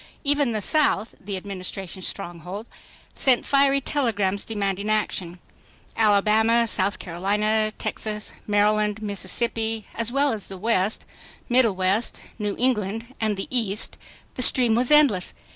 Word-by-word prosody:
Even 285 -3 +2
the 215 -2 -2
South, 260 -7 +2
the 195 0 -4
Administration's 185 -1 -6
stronghold, 185 +3 -6 0.5
sent 260 -3 +2
fiery 275 0 +3
telegrams 210 -9 -1
demanding 200 -1 -2
action. 190 -5 -1 0.6
Alabama, 220 +2 +3
South 200 -2 +1
Carolina, 210 +5 0
Texas, 210 -1 -3
Maryland, 210 0 +2
Mississippi, 225 +2 -1
as 230 0 -1
well 275 0 +2
as 210 -3 -6
the 190 - -8
West, 210 0 0 0.4
Middle 240 -5 +4
West, 190 +5 0 0.2
New 210 -1 -2
England 225 -1 -1
and 215 -2 0
the 195 - -4
East—the 225 +1 -1
stream 245 -2 +4
was 240 +2 +2
endless. 285 -12 +4
215 Hz, 125 wpm, -24 LUFS, 200-235 Hz, 0.6 s, Middle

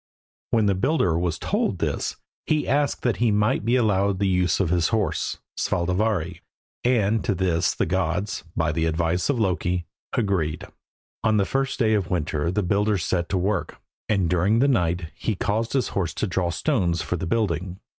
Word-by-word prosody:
When 110 -2 +2
the 100 - +3
builder 95 - +1
was 85 -1 0
told - - -1
this - - -2 0.3
he 155 -1 +1
asked 145 +2 +1
that 120 - +1
he 120 -1 +2
might 105 0 +2
be 120 +3 +2
allowed 100 -5 +2
the 100 +1 +1
use 90 -1 +2
of 90 -4 +1
his 85 -3 +2
horse, 105 -8 -1 0.2
Svadilfari, 90 -1 0 0.4
and 115 -3 +2
to 105 - 0
this 90 -1 +1
the - - +1
gods, 95 +3 -1
by 80 -2 +1
the 80 +1 0
advice 85 - 0
of 135 -4 +1
Loki, 90 -3 0 0.3
agreed. 95 -9 0 0.6
On 110 -1 +3
the 100 - +3
first 135 +4 -1
day 110 -3 +2
of 100 -4 0
winter 75 -2 -1
the 100 +3 0
builder 105 +3 +1
set 85 0 -1
to 95 - 0
work, 95 +1 -1 0.3
and 95 -5 +2
during 90 +6 +2
the 135 +4 +4
night 90 - 0
he 110 - -2
caused 110 +5 -1
his 135 -2 +1
horse 85 -5 -2
to - - -1
draw 90 -2 -1
stones 85 - 0
for - - -2
the 90 +1 -4
building. 95 -3 -1
95 Hz, 185 wpm, -24 LUFS, 85-110 Hz, 0.6 s, the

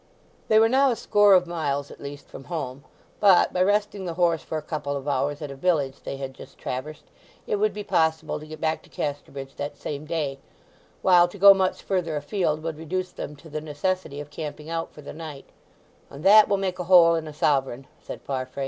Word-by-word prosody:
They 215 - +4
were 220 +1 +6
now 265 +3 +4
a 240 - +1
score 205 -2 +5
of 180 -1 +4
miles 145 -5 -3
at - - -13
least 140 0 -8
from 135 - -11
home, 140 -6 -5 0.4
but, 195 -4 +5
by 180 - 0
resting 205 0 +1
the 170 -2 -4
horse 170 -2 +2
for 160 - -4
a - - -3
couple 150 -2 -3
of 140 +1 -8
hours 145 +2 -1
at 145 - -5
a - - -8
village 140 -3 0
they 135 - -5
had 135 -1 -6
just - - -14
traversed, 140 +4 -5 0.4
it 210 - -1
would 215 +1 +2
be 210 - -6
possible 160 -4 0
to 155 - -11
get 155 0 -9
back 160 0 -1
to - - -21
Casterbridge 140 -2 -5
that 145 0 -5
same 150 +1 -6
day, 145 -4 -2 0.6
while 175 -2 +6
to 175 - -11
go 200 +1 +9
much 190 -1 -1
further 180 -5 -1
afield 155 +1 -1
would 160 -2 -4
reduce 180 +3 -3
them 150 - -7
to 145 +3 -15
the 155 0 -5
necessity 155 0 -3
of 145 0 -8
camping 150 +1 -7
out 165 0 -3
for 150 - -13
the - - -8
night, 155 -3 -8 0.6
"and 140 +2 -11
that 210 +3 +8
will 200 - +2
make 190 -1 -3
a 180 - -3
hole 170 -2 +7
in 165 -1 -2
a - - -6
sovereign," 135 -3 0 0.2
said - - -9
Farfrae. 130 0 -4
160 Hz, 220 wpm, -25 LUFS, 145-185 Hz, 0.6 s, go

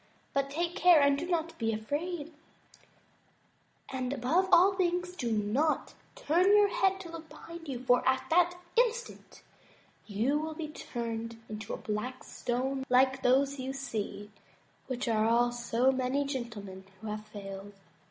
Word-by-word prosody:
But 275 0 0
take 340 +4 -2
care 355 -3 +6
and 280 -1 +4
be 305 +5 -3
not 335 -2 -1
afraid; 290 +9 -2 1.6
and, 255 -1 -2
above 300 +9 +1
all 365 +3 +7
things, 360 -1 -1
do 240 -9 -2
not 220 +9 0 0.2
turn 365 -8 +2
your 410 -1 +5
head 385 0 +2
to 340 -3 -9
look 325 -1 -9
behind 330 +2 -10
you, 265 -3 -3
for 245 -1 +4
at 260 0 +1
that 355 +1 +4 0.2
instant 475 0 -1 0.6
you 230 +8 +1
will 315 0 -4
be 310 -1 -5
turned 230 -5 -5
into 215 0 -6
a - - -8
black 220 +5 -4
stone 265 +2 -2
like 260 +1 +4
those 275 +2 +3
you 260 +1 -3
see, 220 -6 -5 0.6
which 250 -2 -3
are 220 -1 +2
all 240 +1 +3
so 240 +2 +1
many 265 +2 0
gentlemen 230 -8 -5 0.2
who 220 - -11
have 215 0 -5
failed. 200 -1 -8
265 Hz, 150 wpm, -30 LUFS, 230-330 Hz, 1.6 s, all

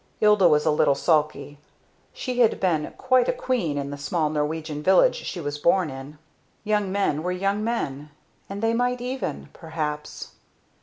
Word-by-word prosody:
Ilda 210 -3 +5
was 150 -2 +3
a 155 - +4
little 145 -2 +3
sulky. 150 -2 0 0.5
She 250 -1 -4
had 235 -3 +3
been 165 -5 0
quite 255 -1 +3
a - - +5
queen 250 - -1
in 140 0 -3
the 145 - -7
small 155 +1 -1
Norwegian 155 0 -2
village 190 - +5
she 185 - -6
was 145 -2 -4
born 170 0 +2
in. 135 +3 -9 0.5
Young 210 -2 0
men 190 -7 0
were 180 +2 -2
young 195 +3 -1
men 150 - -3 0.4
and 200 +2 -6
they 225 0 +2
might 245 +1 0
even 255 +2 -4
perhaps! 150 -2 -5
170 Hz, 165 wpm, -24 LUFS, 150-215 Hz, 0.5 s, Ilda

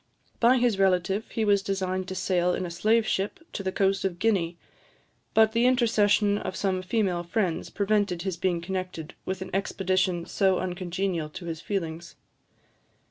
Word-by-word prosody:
By 245 +2 +5
his 240 -5 +2
relative 190 +2 +1
he 225 - -1
was 200 -1 +4
designed 185 -1 -2
to 190 - -5
sail 180 -1 +1
in 185 - -3
a 175 - -5
slave 215 +6 +2
ship 195 -1 -1
to - - -3
the 190 -1 -2
coast 195 0 +1
of 190 -3 -1
Guinea; 180 -5 +1 0.8
but 220 0 +6
the 230 +2 +3
intercession 210 -4 +3
of 185 - -5
some 190 -2 0
female 185 -2 0
friends 175 -1 -1
prevented 200 -4 0
his 190 -3 -2
being 175 -1 0
connected 180 -3 -5
with 190 0 -2
an 185 - -10
expedition 185 -2 0
so 190 -2 +2
uncongenial 180 -2 -2
to 170 +3 -9
his 165 -2 -5
feelings. 170 -4 -4
190 Hz, 165 wpm, -27 LUFS, 180-205 Hz, 0.8 s, but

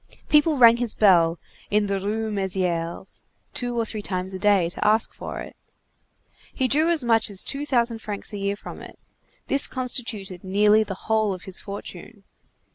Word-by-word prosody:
People 300 0 +4
rang 235 -2 +7
his 240 -3 -1
bell, 175 -5 +4 0.3
in 210 0 +2
the 200 -1 -1
Rue 215 +3 -2
Mésières, 185 -3 -3 0.3
two 245 -1 -3
or 230 - 0
three 215 -1 -3
times 185 -1 -4
a 190 - -5
day, 200 -4 +3
to 175 - -5
ask 215 +1 +2
for - - -7
it. - - -10 1.0
He 260 - 0
drew 310 +6 +2
as 330 -5 +2
much 225 -2 +2
as 195 -2 0
two 285 +1 -3
thousand 235 -4 +1
francs 210 -1 -5
a - - -4
year 200 0 -1
from - - -10
it; - - -12 0.5
this 275 - +3
constituted 230 -8 -4
nearly 210 +3 +4
the 195 -3 -7
whole 215 -3 +1
of 185 - -12
his 190 -1 0
fortune. 200 +1 -9
210 Hz, 180 wpm, -24 LUFS, 190-235 Hz, 1.0 s, rang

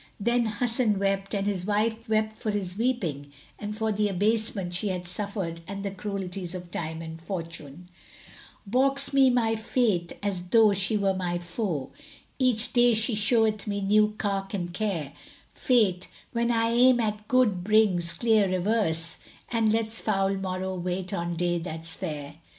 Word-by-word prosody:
Then 235 +2 +2
Hasan 225 0 0
wept 195 +1 -1
and 200 0 -1
his 200 -3 -1
wife 220 +3 -1
wept 215 0 +1
for 220 - -4
his 195 -3 -2
weeping 185 - -1 0.3
and 210 0 -5
for 220 0 0
the 210 0 +1
abasement 205 -1 0
she 180 +4 -1
had 180 -2 -3
suffered 185 -3 -3
and 200 0 -5
the 200 - -2
cruelties 190 -2 -5
of 175 -1 -8
Time 160 -1 -4
and 160 0 -8
Fortune, 165 -3 -7 0.8
"Baulks 275 +5 +2
me 270 -1 +6
my 230 -3 +2
Fate 220 -6 0
as 200 -3 -1
tho' 220 +1 +5
she 200 +2 +1
were 195 -1 +2
my 180 -2 -2
foe; 175 - -3 0.2
* - - -28
Each 235 +1 0
day 240 -1 +5
she 225 +2 +1
showeth 215 0 +1
me 205 -1 -1
new 210 +2 +3
cark 195 -1 -2
and 175 -2 -4
care: 180 -8 -2 0.4
Fate, 200 -8 +2 0.2
when 235 0 0
I 230 -1 +2
aim 245 +1 +5
at 215 -2 -2
good, 225 -8 +2
brings 195 -5 +3
clear 215 0 +3
reverse, 180 -4 0 0.2
* - - -24
And 225 -2 +2
lets 225 0 -1
foul 195 -2 +1
morrow 190 -1 -3
wait 180 +1 -3
on 170 -2 -2
day 175 0 0
that's 165 -1 -6
fair." 150 -5 -6
200 Hz, 165 wpm, -27 LUFS, 180-220 Hz, 0.8 s, me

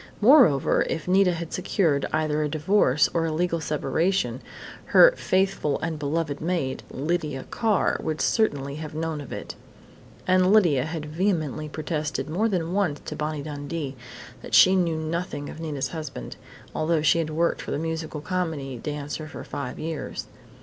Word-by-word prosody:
Moreover, 215 - +5
if 155 - -3
Nita 185 0 +4
had 170 -1 -5
secured 165 -6 +1
either 155 -1 0
a 150 - 0
divorce 155 -2 +3
or 165 -1 +1
a - - -1
legal 170 +1 0
separation, 150 -4 0 0.4
her - - +7
"faithful 185 - +1
and 160 -1 -3
beloved 150 0 -2
maid," 160 -6 -1
Lydia 150 -1 -2
Carr, 220 -5 +1
would 155 -1 -3
certainly 145 - +1
have 155 -1 -7
known 160 -1 -2
of 140 - -10
it. - - -6 0.7
And 185 0 +4
Lydia 165 -12 +4
had 160 -1 -4
vehemently 155 -3 -1
protested 155 0 -3
more 215 +7 +1
than 175 -3 -1
once 185 -8 0
to 150 - -6
Bonnie 150 -1 -3
Dundee 145 -1 -5 0.5
that - - -2
she 185 +1 +7
knew 170 -4 +1
nothing 160 -2 -3
of - - -10
Nita's 150 -4 -3
husband, 155 - -6 0.4
although 155 0 +1
she 165 - +4
had 160 -2 -1
worked 165 +2 0
for - - -8
the - - -1
musical 160 -1 -4
comedy 160 -7 -3
dancer 150 +2 -5
for - - -8
five 125 -3 -5
years. 160 -2 -4
155 Hz, 160 wpm, -25 LUFS, 150-175 Hz, 0.7 s, her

